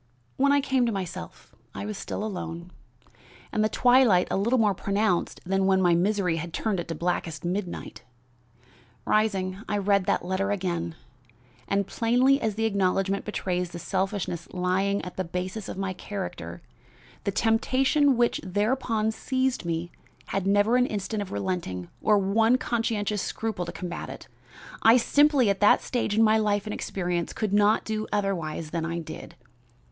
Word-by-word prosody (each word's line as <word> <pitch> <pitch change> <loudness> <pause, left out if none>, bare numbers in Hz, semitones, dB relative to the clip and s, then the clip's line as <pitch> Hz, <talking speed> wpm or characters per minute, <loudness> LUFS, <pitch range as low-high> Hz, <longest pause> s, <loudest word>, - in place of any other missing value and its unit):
"When 280 +1 +3
I 285 0 +4
came 265 -3 +1
to - - +1
myself 180 - -6 0.2
I - - -4
was 210 0 -4
still 200 - -5
alone, 180 -4 -5 0.8
and 215 - +1
the 215 - +2
twilight 245 -8 +4
a - - +1
little 230 +6 +2
more 215 -4 +3
pronounced 200 -1 0
than 195 +1 +1
when 190 -1 +4
my 175 -2 +4
misery 180 -1 +1
had 165 +1 -5
turned 210 -5 -1
it 175 - -4
to 165 - -4
blackest 170 -1 -2
midnight. 180 0 -4 1.0
Rising, 195 -3 +1
I 210 - 0
read 200 -1 +2
that 200 - 0
letter 190 +2 -1
again, 175 -4 -2 0.7
and, 200 0 +1
plainly 250 +7 +2
as 215 -2 -1
the 225 +1 0
acknowledgment 195 -1 +1
betrays 180 -4 -2
the 170 - -8
selfishness 185 -1 -2
lying 190 +2 0
at 180 - -9
the 185 - 0
basis 185 +4 -4
of - - -6
my 195 -1 -2
character, 195 +1 -6 0.6
the - - 0
temptation 260 +4 +2
which 240 0 +2
thereupon 215 +3 0
seized 260 -1 -1
me 170 +1 -2 0.4
had 195 -1 -1
never 205 +4 +4
an 250 0 +3
instant 210 +1 -3
of 200 - -6
relenting 100 - -3
or 210 -1 +4
one 220 +5 +3
conscientious 220 -4 -1
scruple 215 -6 -3
to - - -4
combat 175 -2 -6
it. - - -9 0.5
I 225 +2 +7
simply, 280 -2 +4
at 195 - -3
that 205 - +5
stage 240 -4 -1
in 225 - +5
my 220 0 +4
life 205 -2 +1
and 210 - -4
experience, 175 -2 -2
could 215 -3 -2
not 210 +1 +3
do 215 -1 -2
otherwise 165 -6 -2
than 165 -1 -2
I 170 +1 -2
did. 160 -2 -8
200 Hz, 165 wpm, -26 LUFS, 180-220 Hz, 1.0 s, I